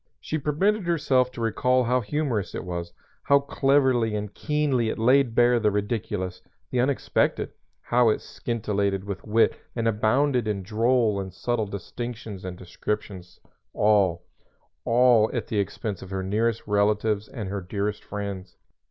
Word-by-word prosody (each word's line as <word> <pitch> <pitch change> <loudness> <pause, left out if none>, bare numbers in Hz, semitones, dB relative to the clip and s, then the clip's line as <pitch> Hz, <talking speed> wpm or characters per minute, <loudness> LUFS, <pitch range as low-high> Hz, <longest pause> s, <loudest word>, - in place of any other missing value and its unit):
She 155 - -3
permitted 185 +7 +1
herself 135 -7 +2
to 120 - -6
recall 125 +3 +2
how 125 +1 +1
humorous 120 -3 -2
it - - -4
was, 85 -1 -4 0.3
how 140 - +4
cleverly 135 -5 +2
and 105 -1 -4
keenly 145 -6 0
it - - -3
laid 125 +1 +3
bare 120 0 +5
the 110 -2 +3
ridiculous, 100 -3 -2 0.3
the 125 - 0
unexpected, 130 +2 +1 0.3
how 120 -1 +3
it 110 - +1
scintillated 100 -4 -2
with 100 -2 -6
wit 110 +1 +3 0.2
and 115 -1 0
abounded 120 +3 +2
in 100 -3 -2
droll 115 +1 +2
and 95 -1 -5
subtle 120 -3 -1
distinctions 105 0 -6
and 90 -1 -6
descriptions 95 -1 -5 0.3
all 100 -5 +3 0.6
all 120 -2 +5
at - - -1
the 105 - -1
expense 100 0 -3
of 95 - -9
her 95 -1 -3
nearest 110 +4 0
relatives 105 0 +1
and 110 -7 -6
her 100 0 -3
dearest 100 +3 -3
friends. 100 -3 -6
110 Hz, 150 wpm, -25 LUFS, 100-125 Hz, 0.6 s, bare